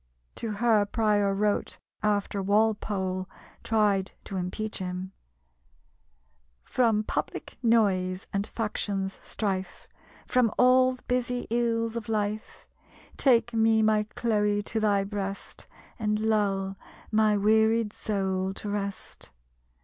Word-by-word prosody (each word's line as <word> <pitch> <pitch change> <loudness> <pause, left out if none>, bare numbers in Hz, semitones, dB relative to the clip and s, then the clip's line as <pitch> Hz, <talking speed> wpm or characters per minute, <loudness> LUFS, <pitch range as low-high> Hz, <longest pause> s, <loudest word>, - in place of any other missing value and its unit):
To 225 -2 -3
her 215 -1 +3
Prior 210 -2 +2
wrote, 205 +1 0 0.2
after 205 -1 0
Walpole 200 -2 0 0.3
tried 205 -3 +1
to 195 - -7
impeach 200 +4 -3
him: 185 0 -4 1.5
"From 225 -4 +2
public - - -4
noise 195 -6 +2
and 200 +1 -1
faction's 200 -3 -3
strife, 190 -3 -4 0.4
From 250 -4 +2
all 255 +1 +5
the 255 - -14
busy 250 0 -1
ills 230 -1 0
of 225 -2 -5
life, 215 0 -3 0.5
Take 240 -3 +3
me, 220 -1 +3
my 215 -1 +2
Chloe, 210 -3 +1
to 220 - -2
thy 205 -2 +2
breast, 195 -1 -6 0.3
And 210 -1 0
lull 200 -3 0 0.3
my 215 -1 +3
wearied 220 +1 +3
soul 190 -2 -2
to 210 - -6
rest. 200 -1 -5
210 Hz, 110 wpm, -27 LUFS, 195-225 Hz, 1.5 s, all